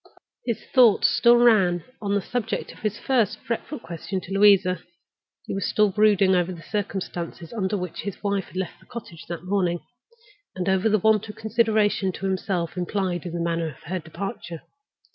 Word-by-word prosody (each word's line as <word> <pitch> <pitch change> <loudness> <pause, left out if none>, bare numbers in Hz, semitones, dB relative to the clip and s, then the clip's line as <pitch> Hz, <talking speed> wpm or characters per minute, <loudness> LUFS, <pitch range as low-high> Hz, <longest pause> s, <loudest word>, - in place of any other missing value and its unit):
His 235 - 0
thoughts 240 -6 +6
still 240 0 +5
ran 195 -8 +4 0.2
on 200 -1 0
the 200 - 0
subject 230 -4 -3
of - - -15
his 215 0 -2
first 240 -7 +1
fretful 235 +6 -4
question 175 +1 -5
to 190 - -7
Louisa—he 185 -4 +1
was 195 0 -1
still 210 -2 +3
brooding 200 -2 +4
over 180 0 +1
the 170 -2 -9
circumstances 180 -5 -4
under 205 -2 -1
which 180 -3 -5
his 200 0 -6
wife 200 -2 0
had - - -18
left 185 -2 -4
the - - -22
cottage 170 -8 -9
that 170 -1 -6
morning, 180 -3 +1 0.8
and 185 0 -3
over 190 +3 +3
the 215 - +4
want 220 +1 +2
of 210 - -7
consideration 220 -3 +1
toward 190 +1 -3
himself 185 -2 -2
implied 180 -1 -2
in 170 - -6
the 170 - -3
manner 170 -1 -1
of 145 - -14
her 180 +4 -3
departure. 170 0 -6
195 Hz, 180 wpm, -24 LUFS, 175-215 Hz, 0.8 s, thoughts